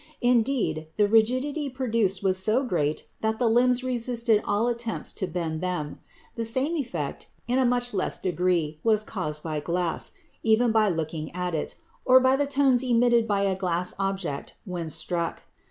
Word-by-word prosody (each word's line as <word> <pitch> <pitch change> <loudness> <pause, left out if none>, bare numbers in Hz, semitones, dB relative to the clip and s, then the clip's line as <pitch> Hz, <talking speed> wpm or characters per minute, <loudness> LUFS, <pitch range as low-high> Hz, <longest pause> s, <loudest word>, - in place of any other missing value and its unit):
Indeed, 235 - +1
the 210 -1 +4
rigidity 255 +7 +2
produced 230 -7 0
was 190 -1 +3
so 215 +7 +2
great 155 - -1 0.2
that 220 0 0
the 245 - +1
limbs 250 +2 +3
resisted 235 -3 +1
all 210 +4 +1
attempts 235 -1 -2
to 190 - -3
bend 165 -3 -3
them. 180 -5 -3 0.4
The 230 - -2
same 260 +8 0
effect, 270 -6 -4 0.2
but 240 - -1
in 260 - +3
a 255 - +3
much 245 -1 0
less 190 - 0
degree, 175 -4 0
was 215 -2 +3
caused 155 -8 -4
by 155 -2 -2
glass, 170 +2 -2 0.3
even 225 +1 +3
by 220 -2 +3
looking 160 -2 -3
at 180 -1 -2
it, 155 - -3 0.3
or 255 0 +7
by 260 +1 +4
the 285 +1 0
tones 270 -3 +3
emitted 240 -2 +3
by 200 -2 +1
a 195 -1 +2
glass 180 -1 -1
object 195 -7 -3
when 175 -3 -4
struck. 165 +2 -3
220 Hz, 170 wpm, -26 LUFS, 180-245 Hz, 0.4 s, or